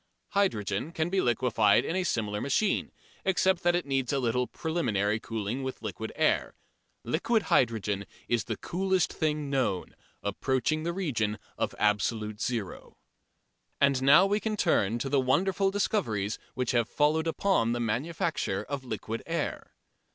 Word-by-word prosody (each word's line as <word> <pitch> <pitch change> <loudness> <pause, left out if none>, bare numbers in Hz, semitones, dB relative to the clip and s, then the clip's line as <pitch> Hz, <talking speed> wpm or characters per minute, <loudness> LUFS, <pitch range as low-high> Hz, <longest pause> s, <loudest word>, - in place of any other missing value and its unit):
Hydrogen 135 - 0
can 165 +1 -1
be 190 -1 +2
liquefied 115 -3 +3
in 165 - -2
a 185 - +1
similar 105 -10 -1
machine, 190 +9 +1 0.3
except 190 -1 +2
that 175 0 +3
it 175 - -1
needs 135 -3 0
a 140 - +1
little 125 -1 0
preliminary 110 - -1
cooling 110 +3 -3
with 130 -2 -5
liquid 110 +1 -5
air. - - +1 0.5
Liquid 195 - +1
hydrogen 105 -4 +1 0.2
is 120 -3 0
the - - -3
coolest 190 0 0
thing 150 -2 -1
known 125 -9 -1 0.3
approaching 130 +9 0
the 170 +2 -1
region 125 - -1 0.2
of - - -2
absolute 105 0 0
zero. 115 -7 -4 0.8
And 140 -2 +3
now 145 +7 +7
we 205 +2 +1
can 215 0 -2
turn 115 - +2
to 120 - -3
the 140 0 +2
wonderful 190 +9 +2
discoveries 120 - -1 0.2
which 125 -2 0
have 120 -2 +1
followed 155 +2 +2
upon 165 -8 +2
the 120 - -2
manufacture 155 - -1
of 140 -2 -5
liquid 115 -1 -4
air. 165 -2 -3
130 Hz, 150 wpm, -29 LUFS, 110-170 Hz, 0.8 s, now